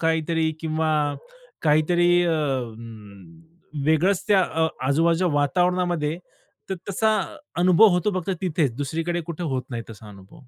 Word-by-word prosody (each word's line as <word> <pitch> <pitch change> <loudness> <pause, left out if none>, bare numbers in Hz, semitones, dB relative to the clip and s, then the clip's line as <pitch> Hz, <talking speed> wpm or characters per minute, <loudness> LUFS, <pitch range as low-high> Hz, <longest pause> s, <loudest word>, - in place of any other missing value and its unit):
काहीतरी 160 0 0
किंवा 160 0 -1 0.7
काहीतरी 165 +3 +3
अ, 170 - +1 1.5
वेगळंच 175 +5 +2
त्या 195 -2 +5
अ, 160 -2 0 0.2
आजूबाजूच्या 165 +5 +2
वातावरणामध्ये 175 +1 0 0.5
तर - - 0 0.2
तसा 220 +3 +1 0.5
अनुभव 185 +5 +6
होतो 180 +4 +1
फक्त 185 - -5
तिथेच. 155 -7 0
दुसरीकडे 165 +5 -2
कुठे 170 +1 -6
होत 130 -1 -1
नाही 115 -1 -4
तसा 105 0 -12
अनुभव. 100 +2 -15
165 Hz, 120 wpm, -23 LUFS, 150-180 Hz, 1.5 s, अनुभव